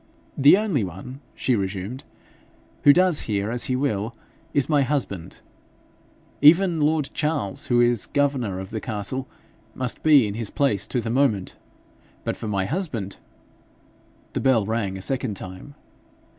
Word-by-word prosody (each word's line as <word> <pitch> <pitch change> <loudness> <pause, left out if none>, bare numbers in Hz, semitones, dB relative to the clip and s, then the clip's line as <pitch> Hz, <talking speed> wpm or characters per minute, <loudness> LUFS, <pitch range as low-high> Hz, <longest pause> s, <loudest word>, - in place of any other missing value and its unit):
'The 140 +6 +7
only 195 - 0
one,' 95 - -8
she 130 - +1
resumed, 100 +6 -4 0.8
'who 145 - +10
does 180 0 +3
here 100 +1 0
as 120 0 0
he 130 - -1
will, 115 -4 -1 0.4
is 140 -2 +1
my 150 -3 +3
husband. 130 - -3 1.0
Even 165 +2 +6
lord 150 -1 +1
Charles, 150 -10 -2
who 120 -1 +3
is 120 -3 +2
governor 135 -9 0
of 95 0 -7
the 110 -1 -4
castle, 125 +3 -3 0.5
must 125 -2 -3
be 150 -6 +6
in 100 - -3
his 110 -1 -3
place 105 -9 0
to 125 - -1
the 115 - -3
moment; 120 -7 +1 0.7
but - - -2
for - - -7
my 100 -2 0
husband 120 - -3 0.6
.' - - -33
The - - -1
bell 125 -6 +3
rang 100 -3 -2
a 95 - -7
second 125 -4 -2
time. 95 +10 -9
125 Hz, 155 wpm, -24 LUFS, 100-145 Hz, 1.0 s, who